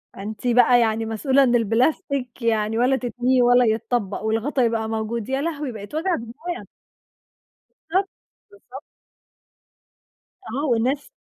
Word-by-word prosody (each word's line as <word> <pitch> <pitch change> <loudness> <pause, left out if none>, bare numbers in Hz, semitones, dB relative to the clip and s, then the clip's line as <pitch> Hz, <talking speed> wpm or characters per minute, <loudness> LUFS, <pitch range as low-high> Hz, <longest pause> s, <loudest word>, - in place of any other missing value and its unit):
أنتِ 215 +5 -6
بَقى 245 0 +5
يعني 225 -1 +1
مسؤولة 260 +5 +2
إن 245 -2 +3
البلاستيك 245 +3 0
يعني 220 -1 0
ولا 250 +3 +3
تتنيه، 250 0 0
ولا 245 0 +5
يتطبق، 220 -2 -1
والغطا 225 +5 0
يبقى 225 -1 0
موجود، 220 0 -3
يا 265 +1 0
لهوي، 300 -4 -3
بَقِت 215 +4 -9
وجع 345 +3 0
دماغ! 305 +10 -6 1.3
بالضبط، 380 +3 +1 0.4
بالضبط. 270 -10 -12 1.6
آه، 275 +6 -3
والناس 255 - 0
245 Hz, 125 wpm, -22 LUFS, 225-270 Hz, 1.6 s, بَقى